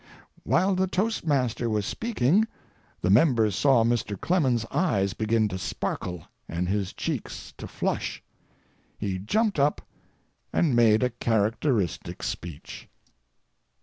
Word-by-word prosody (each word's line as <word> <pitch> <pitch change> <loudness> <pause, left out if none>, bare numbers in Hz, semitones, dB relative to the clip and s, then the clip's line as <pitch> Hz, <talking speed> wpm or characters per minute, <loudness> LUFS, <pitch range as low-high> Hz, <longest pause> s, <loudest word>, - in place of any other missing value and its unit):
While 190 +3 +2
the 190 0 +1
toastmaster 150 - 0
was 105 -2 0
speaking, 215 - +1 0.6
the 90 - +3
members 110 - +4
saw 130 0 +4
Mr. 115 -4 -1
Clemens's 130 -11 +1
eyes 100 - +1
begin 110 +2 +1
to 95 -1 -4
sparkle 90 0 -4 0.3
and 85 +2 -2
his 100 0 -1
cheeks - - -5
to - - -7
flush. - - -3 0.7
He 95 -3 -3
jumped 205 - 0
up, 145 +2 +2 0.7
and 150 -8 +2
made 115 -1 +5
a 125 - +1
characteristic 115 - 0
speech. 80 -3 -6
115 Hz, 115 wpm, -26 LUFS, 100-150 Hz, 0.7 s, made